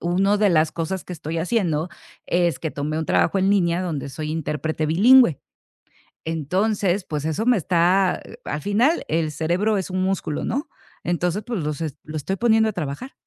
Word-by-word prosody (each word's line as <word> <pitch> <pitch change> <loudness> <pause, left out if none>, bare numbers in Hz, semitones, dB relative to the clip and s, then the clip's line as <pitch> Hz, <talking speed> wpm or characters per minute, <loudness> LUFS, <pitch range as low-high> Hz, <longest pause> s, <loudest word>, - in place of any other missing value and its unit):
uno 195 +4 +2
de 210 -1 +4
las 155 -2 +3
cosas 170 +3 -3
que 180 - -8
estoy 165 0 -4
haciendo, 170 -4 0 0.4
es 175 -1 +1
que 160 - -3
tomé 150 +2 -3
un 160 - -2
trabajo 195 - +2
en 195 +1 +2
línea 180 -3 +2
donde 155 -6 -3
soy 150 +3 -5
intérprete 155 0 -2
bilingüe. 205 - +5 0.8
Entonces, 185 +5 0
pues, 150 -1 -4
eso 160 +8 -1
me 245 -2 +5
está 180 +2 +2
eh, 230 - -12
al 150 - -3
final 235 - +2
el 160 -1 0
cerebro 175 +8 0
es 190 - -3
un 185 0 -2
músculo, 185 -5 -2
¿no? 280 +7 -2 0.4
Entonces, 175 +4 -1
pues, 235 -7 -2
los 150 +1 -3
est 155 -3 -4
lo 155 +1 -8
estoy 190 +6 -2
poniendo 220 0 +3
a - - -2
trabajar. 160 - -5
175 Hz, 185 wpm, -22 LUFS, 155-200 Hz, 0.8 s, bilingüe